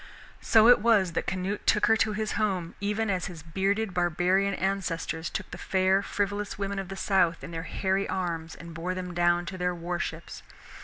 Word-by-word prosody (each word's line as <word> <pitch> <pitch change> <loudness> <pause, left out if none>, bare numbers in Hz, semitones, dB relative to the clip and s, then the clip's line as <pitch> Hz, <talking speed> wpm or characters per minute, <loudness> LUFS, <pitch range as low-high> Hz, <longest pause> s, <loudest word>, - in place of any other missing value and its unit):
So 220 0 +5
it 245 - +8
was 205 -5 +3
that - - -2
Canute 190 +2 -3
took 210 - +4
her 225 - +5
to 215 -1 +1
his 215 0 -2
home, 190 -6 -1
even 210 +2 -1
as 185 -1 -1
his 170 -4 -9
bearded 195 +5 -1
barbarian 180 +3 +1
ancestors 180 -4 -2
took - - -5
the 180 - -7
fair 190 +1 +2
frivolous 205 +1 -2
women 200 0 -2
of 195 -1 -6
the 195 - -5
South 180 -4 +1
in - - -7
their 165 -1 -4
hairy 195 0 0
arms 170 -3 -3
and 170 0 -10
bore 175 +3 -3
them 180 -1 -5
down 175 0 +2
to 185 +3 -6
their 180 0 0
war 175 +1 -3
ships. - - -5
190 Hz, 200 wpm, -28 LUFS, 175-200 Hz, -, it